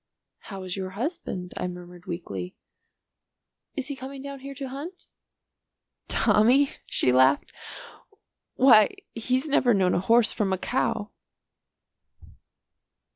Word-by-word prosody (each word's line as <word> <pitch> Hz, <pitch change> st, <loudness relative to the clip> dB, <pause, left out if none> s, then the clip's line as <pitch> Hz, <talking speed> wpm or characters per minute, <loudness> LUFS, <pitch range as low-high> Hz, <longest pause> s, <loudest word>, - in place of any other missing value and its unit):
"How 195 Hz, -2 st, -9 dB
is 185 Hz, -1 st, -4 dB
your 190 Hz, -1 st, -4 dB
husband?" 215 Hz, -, -4 dB
I -, -, -2 dB
murmured 175 Hz, 0 st, -10 dB
weakly. 95 Hz, -, -6 dB, 1.2 s
"Is 275 Hz, -, -4 dB
he 280 Hz, -, -3 dB
coming 265 Hz, +1 st, -8 dB
down 280 Hz, -1 st, -7 dB
here 275 Hz, +1 st, -9 dB
to 275 Hz, 0 st, -5 dB
hunt?" 305 Hz, +8 st, -8 dB, 1.0 s
"Tommy?" 255 Hz, +6 st, +4 dB, 0.2 s
she 125 Hz, -, +3 dB
laughed. 130 Hz, +2 st, +3 dB, 1.0 s
"Why 250 Hz, -, +6 dB, 0.2 s
he's 255 Hz, +5 st, -1 dB
never 250 Hz, -5 st, +3 dB
known 185 Hz, -2 st, +2 dB
a -, -, +2 dB
horse 230 Hz, +4 st, +4 dB
from 205 Hz, -3 st, -1 dB
a -, -, 0 dB
cow." 230 Hz, -1 st, -2 dB
225 Hz, 120 wpm, -26 LUFS, 180-270 Hz, 1.2 s, Why